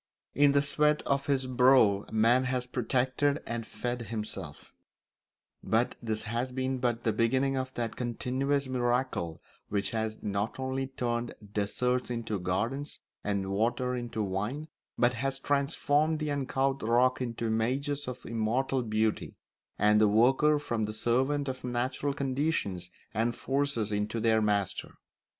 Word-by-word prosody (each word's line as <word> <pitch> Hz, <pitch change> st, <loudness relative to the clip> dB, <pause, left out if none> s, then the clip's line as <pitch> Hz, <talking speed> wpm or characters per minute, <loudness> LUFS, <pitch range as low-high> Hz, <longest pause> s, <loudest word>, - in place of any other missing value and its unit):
In 145 Hz, 0 st, +5 dB
the 140 Hz, 0 st, +4 dB
sweat 150 Hz, +1 st, +2 dB
of 140 Hz, 0 st, 0 dB
his 135 Hz, -2 st, +1 dB
brow 125 Hz, -5 st, +4 dB
man 115 Hz, +4 st, +4 dB
has 125 Hz, -1 st, -1 dB
protected 130 Hz, +4 st, +1 dB
and 115 Hz, -1 st, -4 dB
fed 120 Hz, 0 st, -3 dB
himself; 110 Hz, -2 st, -6 dB, 0.9 s
but 115 Hz, +2 st, +1 dB
this 110 Hz, -2 st, -2 dB
has 120 Hz, +4 st, -2 dB
been 130 Hz, 0 st, -1 dB
but 120 Hz, -2 st, 0 dB
the 110 Hz, -, +1 dB
beginning 130 Hz, +5 st, +2 dB
of 130 Hz, 0 st, -2 dB
that 115 Hz, -2 st, -2 dB
continuous 130 Hz, +3 st, -1 dB
miracle 120 Hz, -9 st, -1 dB, 0.3 s
which 100 Hz, -1 st, 0 dB
has 110 Hz, -1 st, -2 dB
not 105 Hz, +4 st, -2 dB
only 130 Hz, 0 st, -2 dB
turned 120 Hz, -2 st, -2 dB, 0.2 s
deserts 125 Hz, +5 st, 0 dB
into 115 Hz, -4 st, -2 dB
gardens 115 Hz, +11 st, -2 dB, 0.2 s
and 100 Hz, -2 st, -1 dB
water 120 Hz, +5 st, 0 dB
into 120 Hz, -3 st, -3 dB
wine, 105 Hz, +11 st, -3 dB, 0.3 s
but 120 Hz, 0 st, +3 dB
has 135 Hz, +3 st, -2 dB
transformed 145 Hz, +2 st, +1 dB
the 155 Hz, -1 st, -2 dB
uncouth 135 Hz, -1 st, 0 dB
rock 125 Hz, +3 st, +3 dB
into 115 Hz, -2 st, -3 dB
images 130 Hz, +6 st, 0 dB
of 125 Hz, 0 st, -6 dB
immortal 120 Hz, +4 st, 0 dB
beauty, 110 Hz, -1 st, -1 dB, 0.4 s
and 105 Hz, +1 st, +4 dB
the 110 Hz, -, +6 dB
worker 130 Hz, +8 st, +4 dB
from 120 Hz, -7 st, -2 dB
the 110 Hz, 0 st, -5 dB
servant 130 Hz, +6 st, +1 dB
of 130 Hz, -1 st, -4 dB
natural 125 Hz, +3 st, -1 dB
conditions 130 Hz, -, -1 dB, 0.2 s
and 115 Hz, +2 st, 0 dB
forces 135 Hz, -6 st, -1 dB
into 105 Hz, +2 st, -1 dB
their 110 Hz, 0 st, +3 dB
master. 105 Hz, -3 st, -1 dB
125 Hz, 140 wpm, -30 LUFS, 110-135 Hz, 0.9 s, the